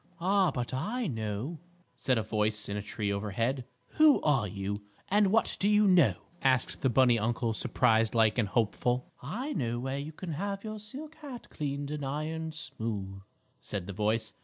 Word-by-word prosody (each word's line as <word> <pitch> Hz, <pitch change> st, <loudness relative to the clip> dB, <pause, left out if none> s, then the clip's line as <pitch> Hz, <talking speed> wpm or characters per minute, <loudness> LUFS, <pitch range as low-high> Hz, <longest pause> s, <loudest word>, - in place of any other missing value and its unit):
"Ah, 190 Hz, +1 st, +3 dB
but 125 Hz, -4 st, -3 dB
I 225 Hz, -, -1 dB
know," 115 Hz, -, -3 dB, 0.4 s
said 130 Hz, -2 st, +1 dB
a 110 Hz, -, +1 dB
voice 105 Hz, -1 st, 0 dB
in 100 Hz, -, -3 dB
a 105 Hz, -, -2 dB
tree 100 Hz, 0 st, -2 dB
overhead. 115 Hz, +6 st, -1 dB, 0.3 s
"Who 310 Hz, -2 st, +7 dB
are 135 Hz, -8 st, +3 dB
you, 100 Hz, +2 st, -4 dB, 0.3 s
and 205 Hz, +1 st, +4 dB
what 220 Hz, +4 st, +2 dB
do 200 Hz, -, +3 dB
you 210 Hz, 0 st, +5 dB
know?" 180 Hz, -6 st, +5 dB, 0.3 s
asked 130 Hz, -2 st, +1 dB
the 135 Hz, -, +3 dB
bunny 120 Hz, -1 st, +5 dB
uncle, 115 Hz, +1 st, 0 dB
surprised 115 Hz, 0 st, +2 dB
like 110 Hz, 0 st, +4 dB
and 110 Hz, -, +2 dB
hopeful. 120 Hz, +3 st, 0 dB
"I 240 Hz, -, -3 dB
know 120 Hz, -7 st, -1 dB
where 135 Hz, +2 st, -2 dB
you 145 Hz, +3 st, -5 dB
can 170 Hz, +2 st, -6 dB
have 195 Hz, +5 st, -3 dB
your 215 Hz, -1 st, -5 dB
silk 275 Hz, +9 st, -8 dB
hat 270 Hz, -5 st, -9 dB
cleaned 140 Hz, -1 st, -3 dB
and 150 Hz, -1 st, -3 dB
ironed 155 Hz, +3 st, -3 dB
smooth," 110 Hz, -10 st, -4 dB, 0.4 s
said 95 Hz, -3 st, -4 dB
the 100 Hz, -, -6 dB
voice. 110 Hz, +3 st, 0 dB
130 Hz, 180 wpm, -30 LUFS, 110-175 Hz, 0.4 s, Who